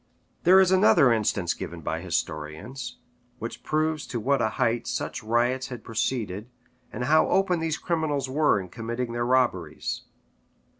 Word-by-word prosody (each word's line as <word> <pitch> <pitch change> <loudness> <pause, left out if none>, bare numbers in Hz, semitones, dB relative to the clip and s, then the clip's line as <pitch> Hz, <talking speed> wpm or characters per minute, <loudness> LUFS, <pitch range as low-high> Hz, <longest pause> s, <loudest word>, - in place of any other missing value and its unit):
There 185 +2 +8
is 190 -1 +5
another 170 - +6
instance 100 -5 0
given - - -7
by - - -3
historians, 105 - -4 0.4
which 115 - -6
proves 155 0 -1
to 120 - -3
what 135 +3 +1
a 110 - +2
height 120 -1 0
such - - -3
riots 120 +4 +1
had 125 -3 -8
proceeded, 115 -2 -2 0.4
and 125 - -4
how 155 +5 +4
open 185 -3 +2
these 160 -2 -1
criminals 155 -5 -1
were 145 -4 +2
in 95 -1 -7
committing 115 +4 -4
their 120 0 -1
robberies. 120 -11 0
125 Hz, 150 wpm, -26 LUFS, 115-150 Hz, 0.4 s, There